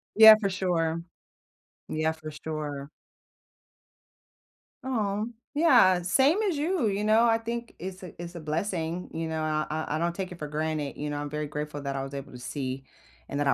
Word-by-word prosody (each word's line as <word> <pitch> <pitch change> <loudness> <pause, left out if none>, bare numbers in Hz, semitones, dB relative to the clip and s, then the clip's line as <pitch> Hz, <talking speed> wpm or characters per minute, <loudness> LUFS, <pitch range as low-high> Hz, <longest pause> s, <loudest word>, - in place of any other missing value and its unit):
Yeah, 220 0 +11
for 200 -2 0
sure. 170 -3 0 0.9
Yeah, 155 +1 0
for 155 -1 -8
sure. 150 -2 -5 2.0
Aw, 215 -5 0 0.3
yeah. 245 - +6
Same 270 - +3
as 375 -7 +1
you, 315 - +1
you 200 +1 0
know? 220 +2 +5
I 225 -1 +4
think 235 +1 -5
it's 185 +1 -6
a 180 - -10
it's 175 0 -7
a - - -5
blessing, 165 +2 -2
you 165 0 -2
know, 160 0 -2
I 155 -1 0
I 155 -1 -2
I - - +1
don't 170 0 0
take 190 0 -4
it 175 - -9
for 150 - -4
granted, 150 -1 -2
you 150 0 -3
know, 145 - -3
I'm 145 0 -3
very 150 0 -3
grateful 150 0 -4
that 140 -1 -2
I 135 - -2
was 135 +1 -7
able 140 -1 -6
to 125 - -10
see 130 +1 -4 0.5
and 140 - -2
that 145 - +1
I - - +5
165 Hz, 195 wpm, -28 LUFS, 150-205 Hz, 2.0 s, Yeah